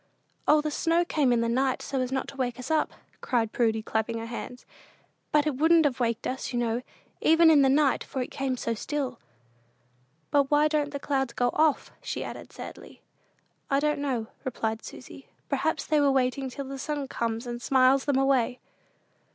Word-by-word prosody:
"O, 300 0 +6
the 305 0 -2
snow 335 +3 +1
came 290 -6 +2
in 235 -1 +3
the 230 - +1
night, 260 +3 0
so 265 -2 -1
not 265 +1 -2
to - - -11
wake 245 -3 -2
us 255 +5 -6
up," 315 -1 +2 0.3
cried 230 -4 0
Prudy, 225 -2 +1
clapping 220 +1 -1
her 225 - -5
hands; 245 +1 -7 0.7
"but 300 -1 +3
it 295 -4 -1
wouldn't 320 +2 +5
have 260 -3 0
waked 235 -1 -1
us, 265 +1 -3
you 245 - -2
know, 235 0 0 0.4
even 325 +1 +6
in 295 -3 +6
the 270 - +4
night, 275 0 +3
for 270 - -6
it - - -9
came 265 -2 -2
so 230 - -2
still." 265 +1 -3 1.1
"But 280 -2 +3
why 295 +1 +4
don't 300 -1 0
the 285 -1 -5
clouds 270 -4 -1
go 245 0 +1
off?" 310 -2 +2
she - - -4
added, - - -8
sadly. - - -10 0.7
"I 275 - +3
don't 300 0 0
know," 260 -6 -1 0.2
replied 225 -3 -3
Susy; - - -11 0.2
"perhaps - - 0
they 310 - +2
are 285 -1 +4
waiting 265 0 +1
till 275 +2 -6
the 270 0 -7
sun 290 0 -3
comes 230 -1 -3
and 240 0 -5
smiles 260 +2 +4
them 280 -2 +2
away." 265 -2 +2
265 Hz, 190 wpm, -27 LUFS, 240-290 Hz, 1.1 s, O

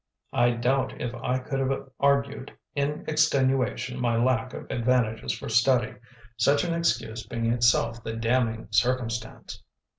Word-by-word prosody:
I 120 0 +4
doubt 125 +3 0
if 120 - -3
I 125 +1 -1
could 135 +1 -4
have 135 0 -2
argued 140 -1 +1 0.2
in 145 +1 -2
extenuation 135 -4 +1
my 120 -2 +1
lack 125 +1 +1
of - - -8
advantages 120 -2 +1
for - - -6
study, 115 +1 +3 0.4
such 140 +5 +3
an 170 -1 -1
excuse 115 -9 -1
being 115 +1 -3
itself 115 -1 +2
the 115 - -4
damning 115 -1 0
circumstance. 115 +1 -1
125 Hz, 140 wpm, -26 LUFS, 115-135 Hz, 0.4 s, I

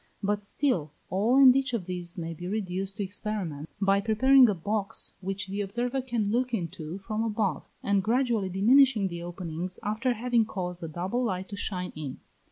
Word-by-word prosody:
But 205 0 -1
still, 180 - 0 0.2
all 215 +7 +3
and 260 -2 +8
each 270 -1 +1
of 200 -6 -3
these 180 -1 -5
may 165 -1 -4
be 175 +2 -7
reduced 195 -1 -3
to 205 - -1
experiment 190 -6 -4
by 195 0 +3
preparing 250 +4 +6
a 205 - +1
box 205 +4 -1
which 195 +1 -2
the 195 +2 -3
observer 240 +6 -2
can 235 -5 -1
look 245 +1 +1
into 170 -3 -5
from 215 +3 -3
above, 210 -8 -1 0.2
and 200 -1 +2
gradually 230 -2 +1
diminishing 220 +2 +4
the 170 -1 -6
openings 175 +1 -5
after 215 +5 0
having 240 0 +1
caused 180 -4 -4
a 165 - -4
double 185 +10 -2
light 190 -3 -3
to 200 - -5
shine 180 -3 -3
in. 150 -4 -6
200 Hz, 180 wpm, -28 LUFS, 180-230 Hz, 0.2 s, and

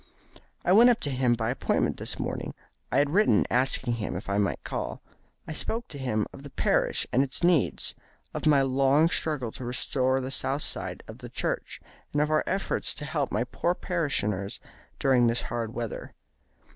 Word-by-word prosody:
"I 175 - +3
went 230 +6 +8
up 240 -1 +3
to 145 - -1
him 125 -2 +2
by 110 0 -1
appointment 130 - 0
this - - -3
morning. - - -4 0.4
I 125 - +2
had 145 0 +3
written 175 - +4
asking 125 -1 +1
him 105 - -3
if 90 - -5
I 100 +1 +1
might 100 - 0
call. - - -4 0.5
I 155 - -4
spoke 230 +9 -3
to 140 - -8
him 115 -5 0
of - - -10
the 140 - -9
parish - - +1
and 130 - +5
its 140 +4 -1
needs, 170 -7 +2 0.4
of - - -2
my 140 -3 +5
long 135 +4 +4
struggle 145 -9 -1
to 130 - -8
restore 130 +1 0
the 130 0 -4
south 135 +2 0
side - - -2
of - - -10
the - - -8
church, - - -3 0.3
and 145 - +1
of 150 +1 +2
our 155 - +3
efforts 195 - 0
to 150 - -5
help 145 -2 -1
my - - +1
poor 170 +8 -1
parishioners 105 - -1 0.4
during 125 -3 +4
this 115 +1 0
hard 115 -2 -3
weather. 115 -2 -5
135 Hz, 190 wpm, -27 LUFS, 120-150 Hz, 0.5 s, went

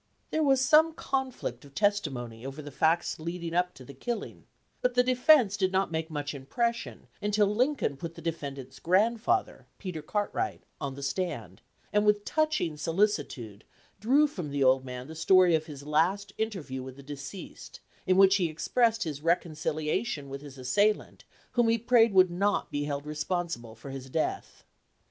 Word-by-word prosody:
There 315 - +1
was 270 -3 +4
some 310 +4 +5
conflict 260 - -3
of 140 -1 -16
testimony 135 - -1
over 135 +3 -7
the 145 - -8
facts 160 +6 +1
leading 170 +1 -4
up 180 +1 +1
to 130 - -12
the 140 - -10
killing, 230 - -5 0.4
but 250 0 +1
the 250 - +5
defense 250 -3 +5
did 190 -2 +1
not 190 -2 +1
make 160 0 -2
much 145 -1 -4
impression 235 - -3 0.2
until 210 0 +2
Lincoln 235 - 0
put 165 +3 -6
the - - -10
defendant's 140 -5 -5
grandfather, 230 - +1
Peter 180 -5 -5
Cartwright, 205 +7 -2 0.2
on 135 -1 -3
the 140 - -8
stand, 180 +6 -3 0.3
and 210 0 +4
with 210 0 +2
touching 305 - 0
solicitude 150 - -1 0.4
drew 270 +8 +4
from 180 - -5
the 140 -1 0
old 130 0 +4
man 125 -1 -7
the 160 - -9
story 180 +2 +5
of 155 0 +1
his 145 -3 -9
last 190 +7 +1
interview 185 -12 -3
with 130 0 -8
the 140 - -13
deceased, 145 +6 -9 0.3
in 185 0 +4
which 195 0 +7
he 175 -4 +1
expressed 225 +8 +1
his 150 -4 -5
reconcilia 155 +1 0
tion 145 -13 -5
with 135 0 -6
his 140 -2 -11
assailant, 205 +12 0 0.3
whom 240 -2 +3
he 230 - +3
prayed 230 0 +4
would 185 -2 +5
not 200 +4 0
be 145 0 -1
held 145 0 -3
responsible 150 -6 -3
for 130 +5 -9
his 135 -1 -7
death. 155 +4 -3
170 Hz, 170 wpm, -29 LUFS, 140-210 Hz, 0.4 s, which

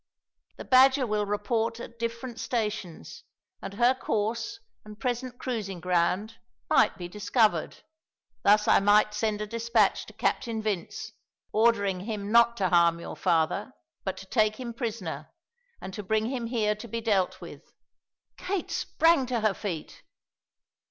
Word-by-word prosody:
The - - -8
Badger 260 +1 +5
will 210 -2 -1
report 220 +3 -1
at 235 0 -10
different 230 +1 -4
stations, 210 - -4 0.4
and 195 - -7
her 240 +3 +4
course 225 - -2 0.2
and 210 0 -12
present 250 -1 -3
cruising 215 -9 -4
ground 180 +5 0 0.3
might - - +4
be 175 - -6
discovered. 210 -2 0 0.6
Thus 210 +1 +4
I - - +6
might 210 +1 +4
send 210 0 -1
a - - -1
despatch 230 -1 +1
to 215 - -12
Captain 225 +1 -1
Vince, 215 +1 -4 0.4
ordering 205 -4 +2
him 205 0 -5
not 235 0 +5
to 190 -2 +1
harm 170 -1 +4
your - - -7
father, 180 +7 0 0.3
but 190 -1 -3
to 195 - -9
take 215 +1 +2
him 235 0 -6
prisoner, 210 - -5 0.5
and 190 - -8
to 210 - -5
bring 215 +2 0
him 245 -3 -3
here 220 -3 +1
to 215 +3 -10
be 230 +1 -3
dealt 200 -5 +1
with." - - -10 0.8
Kate 380 -1 -3
sprang 325 -5 +2
to 240 -2 -1
her 215 -2 +2
feet. 180 -7 -6
215 Hz, 150 wpm, -27 LUFS, 200-235 Hz, 0.8 s, I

